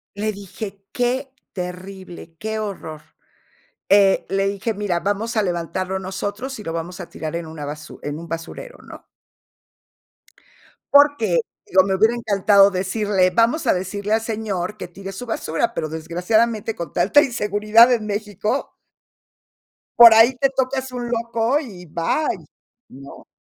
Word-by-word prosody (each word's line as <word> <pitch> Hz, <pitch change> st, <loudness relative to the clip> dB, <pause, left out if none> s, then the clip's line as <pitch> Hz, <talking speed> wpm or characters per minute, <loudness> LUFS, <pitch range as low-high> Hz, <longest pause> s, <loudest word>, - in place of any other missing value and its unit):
Le 215 Hz, +1 st, -1 dB
dije: 200 Hz, 0 st, -8 dB
"Qué 255 Hz, +2 st, -1 dB, 0.2 s
terrible, 180 Hz, -2 st, -8 dB
qué 220 Hz, +3 st, -4 dB
horror". 170 Hz, -7 st, -6 dB, 0.9 s
Eh, 195 Hz, -1 st, +5 dB
le 195 Hz, 0 st, +1 dB
dije: 200 Hz, +3 st, -2 dB
"Mira, 195 Hz, -4 st, -1 dB
vamos 205 Hz, +5 st, -2 dB
a -, -, +4 dB
levantarlo 185 Hz, +2 st, -2 dB
nosotros 205 Hz, +7 st, -5 dB
y -, -, -8 dB
lo 165 Hz, -, -4 dB
vamos 175 Hz, +3 st, -5 dB
a 175 Hz, -, -8 dB
tirar 160 Hz, +1 st, -6 dB
en 170 Hz, -1 st, -4 dB
una 155 Hz, -2 st, -7 dB
basu 150 Hz, +1 st, -8 dB
en 145 Hz, +2 st, -4 dB
un 170 Hz, -, -9 dB
basurero", 165 Hz, -, -7 dB
¿no? -, -, -13 dB, 1.9 s
Porque, 285 Hz, -, +5 dB, 0.3 s
digo, 190 Hz, 0 st, +4 dB
me 190 Hz, 0 st, 0 dB
hubiera 220 Hz, +4 st, +3 dB
encantado 200 Hz, -3 st, +4 dB
decirle: 190 Hz, 0 st, +1 dB
"Vamos 230 Hz, -, +2 dB
a -, -, +4 dB
decirle 200 Hz, +3 st, -3 dB
al 220 Hz, -, +2 dB
señor 210 Hz, -3 st, -3 dB
que -, -, -6 dB
tire 195 Hz, +2 st, -9 dB
su 220 Hz, +6 st, -7 dB
basura", 225 Hz, 0 st, -2 dB
pero, 155 Hz, -, -3 dB
desgraciadamente, 210 Hz, +8 st, 0 dB
con 170 Hz, -3 st, -6 dB
tanta 210 Hz, +12 st, +4 dB
inseguridad 215 Hz, 0 st, +4 dB
en 225 Hz, -3 st, +1 dB
Mexico 210 Hz, +4 st, -3 dB, 1.2 s
por 235 Hz, -1 st, +11 dB
ahí 230 Hz, +3 st, +6 dB
te 275 Hz, +1 st, +2 dB
tocas 265 Hz, 0 st, -1 dB
un 245 Hz, -1 st, -5 dB
loco 235 Hz, +3 st, 0 dB
y 195 Hz, -, -9 dB
bye, 170 Hz, -, -2 dB, 0.4 s
¿no? 135 Hz, +1 st, -13 dB
200 Hz, 145 wpm, -21 LUFS, 180-230 Hz, 1.9 s, por